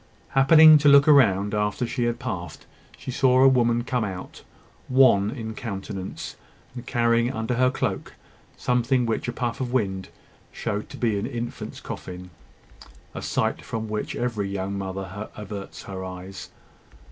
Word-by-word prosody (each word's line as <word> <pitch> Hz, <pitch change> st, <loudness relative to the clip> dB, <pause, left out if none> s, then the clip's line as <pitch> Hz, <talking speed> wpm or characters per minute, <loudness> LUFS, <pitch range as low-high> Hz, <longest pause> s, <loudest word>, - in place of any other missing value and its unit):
Happening 155 Hz, +3 st, +7 dB
to 145 Hz, 0 st, +5 dB
look 140 Hz, 0 st, +7 dB
round 105 Hz, -9 st, +4 dB
after 105 Hz, +3 st, 0 dB
she 120 Hz, 0 st, -2 dB
had 120 Hz, 0 st, -1 dB
passed, 90 Hz, -, -6 dB, 0.3 s
she 130 Hz, -, -6 dB
saw 130 Hz, 0 st, +4 dB
a -, -, +8 dB
woman 120 Hz, -2 st, +3 dB
come 125 Hz, -1 st, -1 dB
out, 95 Hz, -3 st, -7 dB, 0.5 s
wan 125 Hz, -6 st, +5 dB
in 110 Hz, -2 st, -5 dB
countenance, 100 Hz, -5 st, -6 dB, 0.4 s
and 125 Hz, 0 st, -9 dB
carrying 115 Hz, 0 st, +2 dB
under 115 Hz, -1 st, -2 dB
her 125 Hz, +1 st, +3 dB
cloak 125 Hz, -6 st, -3 dB, 0.4 s
something 125 Hz, +1 st, +1 dB
which 115 Hz, +1 st, -2 dB
a -, -, -1 dB
puff 120 Hz, 0 st, -3 dB
of 125 Hz, -2 st, -2 dB
wind 95 Hz, -6 st, -1 dB, 0.4 s
showed 105 Hz, -2 st, -4 dB
to -, -, -9 dB
be 110 Hz, -4 st, 0 dB
an 105 Hz, -, -3 dB
infant's 120 Hz, -3 st, -6 dB
coffin 90 Hz, 0 st, -8 dB, 0.8 s
a -, -, -6 dB
sight -, -, -1 dB
from 110 Hz, -1 st, -4 dB
which 105 Hz, 0 st, -3 dB
every 115 Hz, -5 st, -2 dB
young 100 Hz, 0 st, -3 dB
mother 95 Hz, +1 st, -5 dB
averts 100 Hz, -1 st, -8 dB
her 95 Hz, -1 st, -6 dB
eyes. 95 Hz, +1 st, -8 dB
115 Hz, 155 wpm, -24 LUFS, 100-125 Hz, 0.8 s, a